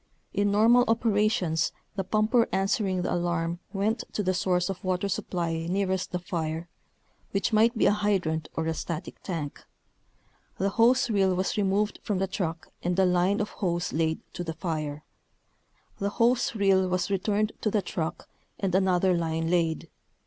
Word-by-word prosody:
In 205 0 +2
normal 225 +4 +5
operations 210 -7 +2 0.2
the 195 - -1
pumper 215 +4 +2
answering 195 -2 0
the - - -1
alarm 170 -1 -1
went 210 +3 0
to 210 - -1
the 185 0 +1
source 180 -1 +1
of 195 -2 -5
water 185 +1 0
supply 170 -4 -2
nearest 190 0 0
the 180 - -1
fire, 165 -2 -3 0.7
which 200 +3 0
might 225 +2 +4
be - - +3
a - - +6
hydrant 195 -7 0
or 160 - -1
a 160 - 0
static 165 +2 -5
tank. 160 -6 -5 0.9
The 195 - +1
hose 240 +4 +3
reel 195 -3 +3
was 185 +1 -1
removed 205 +1 +1
from 205 - -1
the 190 - +1
truck 170 -4 -4
and 175 +1 -1
a 190 - +5
line 180 +3 +2
of 210 - -2
hose 175 -3 -2
laid 160 0 0
to 175 - -4
the 165 -1 -4
fire. 155 -3 -4 1.0
The 200 - 0
hose 235 +3 +2
reel 195 -2 +3
was 185 +2 -1
re 195 - +2
turned 210 +2 0
to 215 - +1
the 205 -1 0
truck 160 -2 -4 0.3
and 190 -3 -1
another 185 -1 +3
line 165 -1 -1
laid. 165 -3 +1
190 Hz, 170 wpm, -27 LUFS, 170-205 Hz, 1.0 s, a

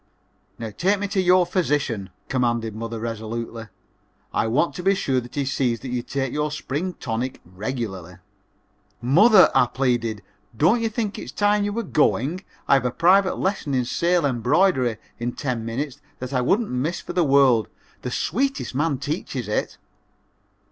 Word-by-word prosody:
"Now 115 -2 -5
take 195 +3 +2
me 205 +1 -2
to 195 -1 +1
your 180 0 +5
physician," 145 - -1 0.2
commanded 120 -4 0
mother, 115 0 -5
resolutely. 115 0 -5 0.7
"I - - +1
want 145 +9 +1
to - - -6
be 195 +2 +3
sure 135 -8 0
that 120 - -12
he 140 -1 0
sees 125 -3 0
that 130 - -6
you 125 -1 -1
take 135 +1 -3
your 150 0 0
spring 150 +4 -3
tonic 125 -2 -4
regularly." 95 -2 -5 0.8
"Mother," 185 - +6
I 130 -2 +4
pleaded, 120 -5 -1 0.3
"don't 190 - +4
you 225 - +1
think 215 -2 -3
it - - -7
is - - -8
time 205 0 +2
you 205 - -1
were 230 +3 -2
going? 155 - +1 0.2
I - - +5
have 135 -2 +3
a - - +2
private 185 +8 +3
lesson 185 -8 -1
in 125 -1 +1
sale 170 +5 +1
embroidery 130 - +2 0.2
in 120 +1 -2
ten 125 -5 -3
minutes 130 +4 -4 0.2
that 130 +1 -6
I 130 - +2
wouldn't 200 - +1
miss 135 +7 -1
for - - -7
the 180 - +3
world 135 -6 +4 0.3
the - - -4
sweetest 270 - -1
man 145 +1 0
teaches 140 - -4
it!" 105 - -2
135 Hz, 170 wpm, -23 LUFS, 120-180 Hz, 0.8 s, Mother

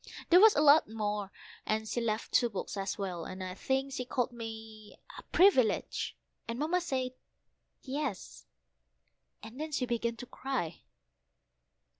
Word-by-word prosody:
There 355 - +9
was 440 0 +8
a 295 - +3
lot 295 -4 +7
more, 210 -2 -2 0.3
and 220 0 -1
she 240 +3 -1
left 220 -1 -2
two 240 - +4
books 200 -1 -5
as 195 -1 -3
well, 180 -4 -3
and 185 +2 -6
I 185 0 -4
think 270 +6 -1
she 255 - -2
called 245 0 -1
me 220 -2 -9 0.2
a - - -8
Privilege, 305 - +3 0.3
and 230 +1 -3
Mamma 325 +6 +1
said 260 -6 -2 0.7
"Yes," 275 -6 -4 1.0
and 225 +6 -8 0.3
began 235 -1 -1
to 240 - -8
cry. 250 - -4
230 Hz, 140 wpm, -31 LUFS, 210-265 Hz, 1.0 s, There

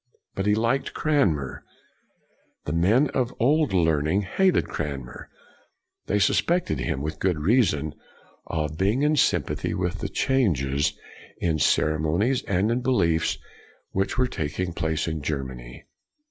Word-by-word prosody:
But 95 +1 -2
he 105 - +4
liked 115 +5 0
Cranmer. 95 - 0 1.0
The 75 - -2
men 105 - +3
of 130 -2 +1
the 125 - -15
Old 150 +5 +2
Learning 80 0 +2
hated 185 - +2
Cranmer. 70 -5 -6 0.8
They 105 - +1
sus 100 - +3
CRANMER 175 - +2
85 80 - -3
pected - - -2
him, 65 - -2
with 75 +1 -4
good 90 -4 +1
reason, 80 - +2 0.5
of 75 -1 -3
being 105 +9 +2
in 150 +1 +3
sympathy - - +1
with 90 0 -2
the - - -3
changes 75 - +1 0.4
in 80 -3 0
cere 75 +1 +2
monies 100 - +1
and 100 +3 +1
in 120 +2 0
beliefs 85 -11 +1 0.5
which 95 +5 -1
were 130 - +3
taking 85 -3 -3
place 80 -1 -1
in 80 -2 -3
Germany. 65 -3 -5
85 Hz, 145 wpm, -25 LUFS, 75-120 Hz, 1.0 s, he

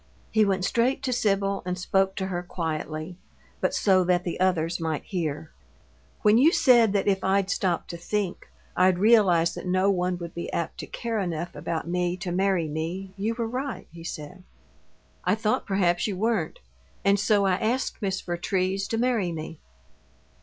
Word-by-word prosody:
He 220 -1 +4
went 190 -2 0
straight 255 +6 +1
to 255 -2 0
Sibyl 195 -3 +1
and 180 0 -3
spoke 190 +1 +1
to 190 - -2
her 180 -2 -3
quietly, 160 -1 -4 0.4
but - - +1
so 190 -2 +3
that 180 0 +2
the 175 - -4
others 175 -2 +1
might 160 -2 -2
hear. 160 -5 -3 0.7
"When 215 +1 +6
you 305 +6 +6
said 240 - +5
that 200 -1 +1
if 195 -1 +2
I'd 195 0 +2
stop 180 -4 0
to 170 - -5
think, 195 +1 -3 0.3
I'd 185 0 +4
realize 190 -5 +4
that - - -7
no 185 +2 +3
one 180 -1 0
would 170 -1 -7
be 170 - -5
apt 170 -1 -3
to - - -6
care 230 -2 -3
enough 175 -3 -3
about 160 +2 -3
me 180 0 -1
to 180 -1 -4
marry 185 -2 +1
me, 170 +5 -4
you 215 +4 -2
were 230 -1 -2
right," 260 +3 -4
he 165 0 -11
said. 170 +3 -7 0.8
"I - - +2
thought 215 -1 -1
perhaps 180 -2 +1
you 200 -3 -3
weren't, 215 -5 0 0.5
and 200 0 +4
so 205 -1 +3
I 190 - +3
asked 240 +6 -1
Miss 190 -2 -1
Vertrees 185 +2 -1
to 225 - -2
marry 230 -7 +1
me. 160 -1 -6
185 Hz, 180 wpm, -26 LUFS, 175-205 Hz, 0.8 s, When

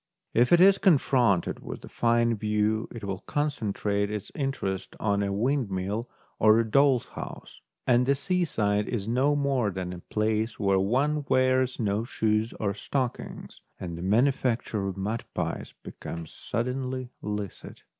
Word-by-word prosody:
If 120 +2 +3
it 175 - +7
is 195 +2 +7
confronted 130 - +3
with - - -8
a - - -12
fine 115 0 +2
view, 105 +1 0
it 115 - -8
will 95 -1 -3
con 150 0 -1
centrate 100 -4 -1
its 105 -2 -5
interest 100 -9 -3
on 100 -1 +1
a 100 -1 -1
windmill 105 -2 -1 0.3
or 110 0 +6
a 115 - +3
doll's 135 +1 +4
house, - - -9 0.2
and 125 0 +3
the 140 - +4
seaside 125 - 0
is 110 -4 -2
no 130 +5 +2
more 135 -6 +1
than 90 -1 -4
a 90 - -7
place 110 +4 -1
where 100 -2 +3
one 140 +9 +1
wears 130 0 +2
no 105 -1 0
shoes 110 -2 0
or 100 -2 0
stockings, 125 +4 -4 0.2
and 85 -2 -5
the 85 - -7
manufacture 115 0 +1
of 95 0 -4
mud 105 +4 -2
pies - - -3
becomes 85 -2 -7
suddenly 125 +1 -3
licit. 105 -3 -6
115 Hz, 155 wpm, -27 LUFS, 100-130 Hz, 0.3 s, it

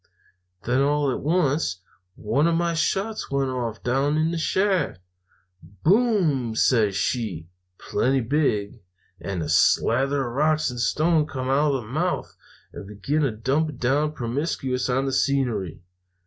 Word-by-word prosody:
"Then, 125 +3 +1
all 145 0 +1
at - - -3
once, 145 - 0 0.4
one 120 +9 +1
of 170 - +2
my 170 0 0
shots 195 +6 -1
went 140 -1 0
off 120 -3 -4
down 135 +4 +1
in 160 +1 +1
the 170 - -2
shaft. 185 - 0 0.6
"'Boom!' 150 - +1
says 110 -4 +2
she, 95 -7 -2 0.3
plenty 130 +1 0
big; 115 -4 -1 0.4
and 90 -1 -4
a - - -4
slather 135 +4 +2
of 120 - -6
rocks 155 +1 +1
and 120 - -7
stones 155 +4 +1
come 130 -1 -3
out 145 +1 +2
of 130 - -3
the - - -13
mouth, 155 +9 -2 0.4
and 95 - -9
began 105 +10 -2
to 140 - +2
dump 135 +7 -1
down 145 +5 +1
promiscuous 130 0 -2
on 135 +2 +1
the 135 - -2
scenery. 120 - -1
135 Hz, 150 wpm, -24 LUFS, 120-155 Hz, 0.6 s, of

